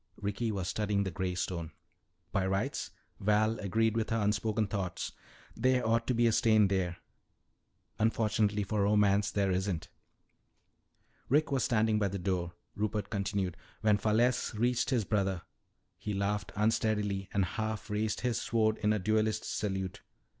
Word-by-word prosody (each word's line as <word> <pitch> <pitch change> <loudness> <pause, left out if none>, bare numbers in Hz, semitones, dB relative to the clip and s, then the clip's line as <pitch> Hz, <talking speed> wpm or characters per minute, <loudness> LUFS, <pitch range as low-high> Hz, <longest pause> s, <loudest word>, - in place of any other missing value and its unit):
Ricky 105 +3 -2
was 95 -4 -3
studying 105 -1 0
the 95 - -3
gray 90 +1 -2
stone. 85 -2 -3 0.6
"By 95 -2 +1
rights," 95 0 -1 0.3
Val 105 +2 +2
agreed 110 +3 +1
with 115 -1 0
her 115 - +1
unspoken 105 +1 +1
thought, 100 -3 -3 0.4
"there 125 +1 +2
ought 115 +1 +2
to 125 - +1
be 120 +1 +3
a 115 - +5
stain 110 -3 +4
there. 90 -3 0 1.0
Unfortunately 110 -2 +2
for 105 +1 -1
romance, 100 0 +3
there 100 -2 +1
isn't." 95 -2 -1 1.4
"Rick 150 +3 +3
was 135 -3 +1
standing 110 -2 +2
by 100 - +2
the 100 +1 -3
door," 90 -2 -2 0.2
Rupert 105 0 -2
continued. 100 -4 -1 0.3
"When 105 -1 +3
Falesse 115 +3 +2
reached 120 +2 +1
his 120 -7 +1
brother, 95 -4 0 0.6
he 105 - -3
laughed 100 +1 -1
unsteadily 105 -2 0
and 100 -2 +2
half 110 +2 -3
raised 105 0 -1
his 120 -2 0
sword 110 -2 +1
in 105 0 +2
a - - +1
duelist's 110 +2 0
salute. 95 -3 -3
105 Hz, 150 wpm, -31 LUFS, 100-110 Hz, 1.4 s, a